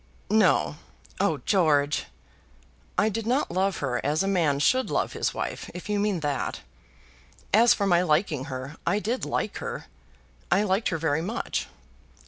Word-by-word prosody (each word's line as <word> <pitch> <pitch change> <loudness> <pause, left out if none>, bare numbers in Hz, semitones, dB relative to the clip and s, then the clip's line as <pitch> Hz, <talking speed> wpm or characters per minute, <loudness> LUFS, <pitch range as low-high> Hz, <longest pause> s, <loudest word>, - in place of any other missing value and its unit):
"No." 205 -7 +3 0.4
"Oh, 165 -8 +1
George!" 150 -6 +2 0.9
"I 215 - +4
did 220 +1 -2
not 260 +4 +1
love 190 +1 +1
her 125 -2 -2
as 150 +5 +1
a - - -1
man 165 -8 +2
should 255 - +2
love - - 0
his - - -1
wife, - - -4
if 180 +3 -7
you 205 -1 +1
mean 200 -4 0
that. 145 -3 -2 0.9
As 230 +3 +6
for 200 - -1
my 175 -3 +4
liking 155 -4 +1
her, 135 +3 -6
I 205 - +1
did 230 +5 -2
like - - -2
her. - - -5 0.6
I 200 - +3
liked 200 +2 +1
her 165 - -1
very 160 -1 0
much." 215 +8 -3
185 Hz, 160 wpm, -26 LUFS, 150-210 Hz, 0.9 s, As